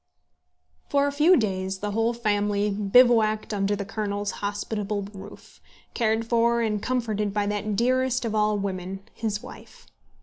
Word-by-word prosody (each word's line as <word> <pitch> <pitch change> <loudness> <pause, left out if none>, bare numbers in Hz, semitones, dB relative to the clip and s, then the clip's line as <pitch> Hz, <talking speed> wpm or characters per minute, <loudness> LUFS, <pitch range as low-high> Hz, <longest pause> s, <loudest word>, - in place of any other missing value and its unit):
For 280 0 +3
a 285 - 0
few 305 +6 +5
days 190 -3 -1
the 205 +2 -4
whole 225 +2 +1
family 205 -3 0
bivouacked 215 +1 +3
under 200 0 0
the 200 0 -4
Colonel's 205 -1 -3
hospitable 205 0 -3
roof, 200 +1 -12 0.3
cared 225 -1 0
for 235 0 +2
and 210 -2 -1
comforted 215 -5 -1
by 205 -1 +1
that 205 0 -2
dearest 255 +2 +1
of 220 - -2
all 210 -1 +2
women, 190 -1 -4
his 210 -2 -3
wife. - - -13
210 Hz, 145 wpm, -25 LUFS, 205-230 Hz, 0.3 s, few